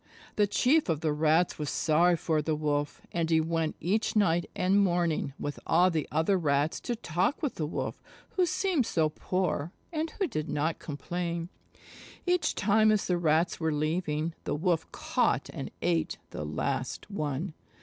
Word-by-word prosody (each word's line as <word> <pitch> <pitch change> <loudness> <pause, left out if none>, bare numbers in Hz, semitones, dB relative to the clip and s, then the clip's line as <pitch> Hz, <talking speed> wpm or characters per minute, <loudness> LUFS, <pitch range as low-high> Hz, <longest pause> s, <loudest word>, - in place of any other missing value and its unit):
The 205 -1 +3
Chief 260 - +3
of 155 -2 0
the 155 -2 +1
Rats 155 +3 +2
was 150 -2 -2
sorry 170 +3 +3
for 155 -1 0
the 155 +1 0
Wolf, 145 -1 -1
and 165 -1 -1
he 160 -1 +4
went 165 0 0
each 210 +7 0
night 175 -5 +2
and 195 +2 +3
morning 175 -6 +1
with 145 - -4
all 180 +3 +4
the 155 -3 -1
other 180 +4 +2
Rats 145 -1 +1
to 240 - -3
talk 185 - -1
with 290 - 0
the 155 - -3
Wolf, - - -4 0.3
who 365 -2 +2
seemed 335 - +1
so 160 -2 +2
poor, 175 -1 -1 0.2
and 320 +1 -1
who 390 - -1
did 155 - -3
not 155 +3 -1
complain. 170 +3 -4 0.8
Each 360 -1 +1
time 215 +1 +4
as 210 -2 +2
the 180 -1 +1
Rats 165 +1 +2
were 160 -1 0
leaving, 155 +1 -1
the - - -1
Wolf 165 0 0
caught - - 0
and - - -5
ate 80 -2 +1
the 75 - -5
last 130 - -3
one. 155 -1 -2
165 Hz, 170 wpm, -29 LUFS, 155-190 Hz, 0.8 s, he